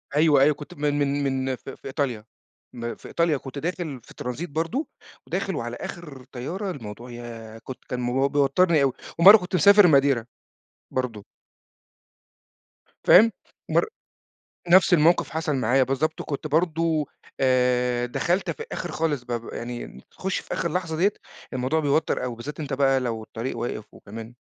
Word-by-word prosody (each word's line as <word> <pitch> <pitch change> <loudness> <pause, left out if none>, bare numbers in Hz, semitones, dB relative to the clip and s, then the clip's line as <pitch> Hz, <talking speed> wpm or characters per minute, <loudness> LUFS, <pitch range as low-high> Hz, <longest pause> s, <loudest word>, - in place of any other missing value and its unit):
أيوه، 150 -2 +5
أيوه 150 +2 +5
كنت 150 - -10
من 145 0 -1
من 145 0 0
من 130 -1 -1
في 135 - -10
في - - -10
إيطاليا، 130 -6 -2 0.5
م 115 -1 -5
في - - -13
إيطاليا 170 -3 +1
كنت 135 +1 -9
داخل 165 -4 -4
في - - -15
ترانزيت 125 +8 -5
برضه، 165 - -2 0.4
وداخل - - -2
وعلى - - -4
آخر 150 -7 -8
طيارة، 180 +11 -4
الموضوع 120 -3 -8
ياه! 115 -2 -9
كنت 130 - -9
كان 125 +2 0
بيوَتّرني 145 +4 +3
أوي، 135 -2 +2 0.3
ومرة 200 +6 +10
كنت 180 -2 -4
مسافر 200 +3 +7
ماديرا، 135 -6 +3 0.7
برضه. 120 -5 -3 1.8
فاهم؟ 225 +5 +7 0.4
مر - - +3 0.8
نفس 185 +2 +6
الموقف 170 +2 +3
حصل 155 -2 -1
معايا 130 +1 +3
بالضبط، 135 +5 -1
وكنت 145 +1 -4
برضه، 160 0 +1 0.3
آآ 125 -1 +2
دخلت 175 +9 0
في - - -7
الآخر 185 - -6
خالص 155 -4 -1
ب 120 -1 -4
يعني 120 - -7
تخُش 190 0 -3
في - - -6
آخر 170 -3 -2
لحظة 165 -3 -2
ديّة، 195 +6 +3 0.4
الموضوع 130 +5 0
بيوَتّر 145 +2 +1
أوي، 125 - -3
وبالذات 120 +7 -7
أنت 145 -2 -5
بَقى 135 -1 +3
لو 115 -3 -3
الطريق 115 +3 -5
واقف 115 -2 -4
وكمان 115 +3 -10
140 Hz, 155 wpm, -25 LUFS, 125-165 Hz, 1.8 s, ومرة